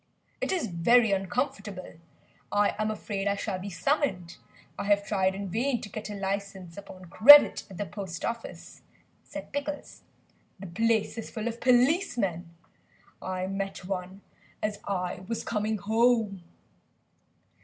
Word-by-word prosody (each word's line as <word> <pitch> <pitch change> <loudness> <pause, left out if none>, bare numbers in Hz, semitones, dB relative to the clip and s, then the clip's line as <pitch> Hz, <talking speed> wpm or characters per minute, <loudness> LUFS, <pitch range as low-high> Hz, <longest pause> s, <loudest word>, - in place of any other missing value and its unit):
"It - - -1
is 365 -7 0
very 220 +5 +3
uncomfortable, 195 - -3 0.5
I 205 0 +2
am 215 0 0
afraid 205 -2 -3
I 200 - +2
shall 200 -2 -3
be 195 +2 -6
summoned. 190 - -1 0.4
I - - -3
have 200 0 +2
tried 190 -2 +1
in 200 0 -5
vain 240 +6 0
to 205 - -8
get 215 +1 -6
a 205 - -5
licence 195 -3 -4
upon 190 -2 -11
credit 280 +12 +8
at 190 - -10
the 205 - -2
Post 190 -5 -6
Office;" 235 0 -6 0.4
said 295 0 -9
Pickles. 285 +1 -5 0.6
"The 195 - -8
place 220 +5 0
is 225 - -7
full 220 0 -4
of 235 0 -5
policemen. 245 - +2 0.7
I 185 0 -3
met 195 -1 -4
one 185 +1 -5 0.4
as 210 -1 -2
I 180 -3 -2
was 230 0 -3
coming 215 0 -1
home." 220 -1 +2
205 Hz, 145 wpm, -28 LUFS, 190-230 Hz, 0.7 s, credit